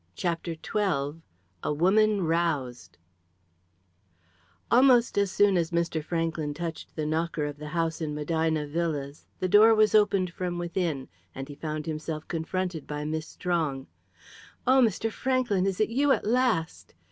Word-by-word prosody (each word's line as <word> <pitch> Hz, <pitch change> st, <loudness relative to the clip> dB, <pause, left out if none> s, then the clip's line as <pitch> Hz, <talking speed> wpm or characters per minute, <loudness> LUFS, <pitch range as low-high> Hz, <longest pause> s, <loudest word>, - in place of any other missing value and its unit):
CHAPTER 170 Hz, -1 st, -2 dB
XII 160 Hz, -5 st, -2 dB, 0.4 s
A -, -, -1 dB
WOMAN 200 Hz, +6 st, +3 dB
ROUSED 140 Hz, -, -1 dB, 1.7 s
Almost 245 Hz, -1 st, +5 dB
as 200 Hz, -1 st, +2 dB
soon 200 Hz, 0 st, +3 dB
as 165 Hz, -2 st, 0 dB
Mr. 170 Hz, -2 st, -1 dB
Franklyn 165 Hz, -2 st, -2 dB
touched 165 Hz, 0 st, -6 dB
the 155 Hz, -, -2 dB
knocker 160 Hz, 0 st, -1 dB
of 145 Hz, -1 st, -5 dB
the 150 Hz, -, -7 dB
house 165 Hz, +1 st, -2 dB
in 150 Hz, -2 st, -3 dB
Medina 160 Hz, 0 st, 0 dB
Villas, 145 Hz, -2 st, -3 dB
the 185 Hz, -, 0 dB
door 215 Hz, +4 st, +7 dB
was 215 Hz, 0 st, +4 dB
opened 200 Hz, -4 st, +3 dB
from 180 Hz, -1 st, -3 dB
within, 170 Hz, -5 st, -2 dB, 0.3 s
and 135 Hz, 0 st, -6 dB
he 145 Hz, -, -8 dB
found 155 Hz, +1 st, -5 dB
himself 155 Hz, -1 st, -5 dB
confronted 170 Hz, 0 st, -3 dB
by 150 Hz, 0 st, -4 dB
Miss 155 Hz, +1 st, -3 dB
Strong. 155 Hz, -7 st, -2 dB, 0.8 s
"Oh, 260 Hz, +1 st, +5 dB
Mr. 225 Hz, -1 st, +1 dB
Franklyn, 245 Hz, -7 st, 0 dB
is 190 Hz, -2 st, -2 dB
it 215 Hz, -, +2 dB
you 275 Hz, +5 st, +2 dB
at -, -, +1 dB
last?" 225 Hz, -8 st, 0 dB
165 Hz, 145 wpm, -27 LUFS, 155-200 Hz, 1.7 s, door